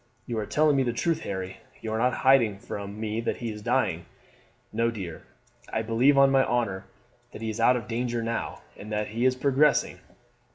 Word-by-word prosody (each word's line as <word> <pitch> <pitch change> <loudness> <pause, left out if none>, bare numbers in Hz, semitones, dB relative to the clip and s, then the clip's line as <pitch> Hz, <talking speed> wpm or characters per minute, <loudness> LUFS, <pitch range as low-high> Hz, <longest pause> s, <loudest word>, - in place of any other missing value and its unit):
"You 115 -2 -3
are 105 - -3
telling 150 -1 +3
me 135 - +3
the 120 -2 0
truth, 165 +6 0
Harry? 95 -5 -5 0.2
You 110 -1 -4
are - - 0
not 125 +2 +2
hiding 120 -7 +5
from 100 +1 -7
me 110 +1 -2
that 115 - -2
he 115 -2 -4
is 105 0 -8
dying?" 105 -8 0 0.7
"No, 115 0 +2
dear; 95 -8 -6 0.5
I 110 - -1
believe, 120 +5 +3
on 135 0 +6
my 135 -1 +5
honour, 110 -7 -1 0.5
that - - -9
he 110 - -1
is 110 - -7
out 125 +2 +5
of 115 - -6
danger 120 0 -2
now, 115 0 -3
and 105 +1 -10
that 105 0 -1
he 115 +4 -1
is 130 0 +4
progressing. 140 +3 +2
115 Hz, 205 wpm, -27 LUFS, 105-130 Hz, 0.7 s, on